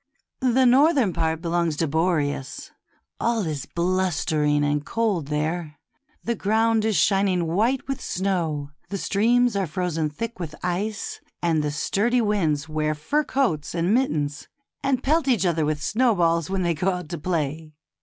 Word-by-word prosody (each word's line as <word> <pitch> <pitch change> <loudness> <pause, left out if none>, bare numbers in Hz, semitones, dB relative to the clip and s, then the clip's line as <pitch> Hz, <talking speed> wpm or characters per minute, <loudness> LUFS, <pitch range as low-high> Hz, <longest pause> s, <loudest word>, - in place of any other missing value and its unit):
The 255 0 +3
northern 265 - +4
part 160 0 -1
belongs 170 -2 0
to 165 - +1
Boreas. 150 -3 -1 0.5
All 230 -4 0
is 150 -4 -4
blustering 165 -5 +1
and 145 0 0
cold 205 -7 -1
there; 155 +1 -2 0.5
the 235 - 0
ground 220 +1 +1
is 220 -2 +1
shining 195 -3 +2
white 220 +12 0
with 270 -1 -3
snow, 165 -7 -2 0.2
the 200 - -3
streams 235 +4 +2
are 195 -2 0
frozen 165 -1 -1
thick 230 +8 -6
with 165 -4 -5
ice, 200 +4 -3 0.2
and 165 -3 +1
the 150 - -1
sturdy 210 +11 +1
winds 170 -10 0
wear 155 0 -1
fur 285 - 0
coats 170 - -1
and 170 +4 +1
mittens, 150 - 0 0.3
and 270 -2 0
pelt 310 +2 +2
each 230 -8 +2
other 165 -3 +1
with 150 -1 -2
snowballs 175 -9 +2
when 190 -1 -1
they 170 -1 +1
go 180 +5 0
out 180 -4 -4
to 170 - -5
play. 155 -2 -3
175 Hz, 155 wpm, -24 LUFS, 155-220 Hz, 0.5 s, northern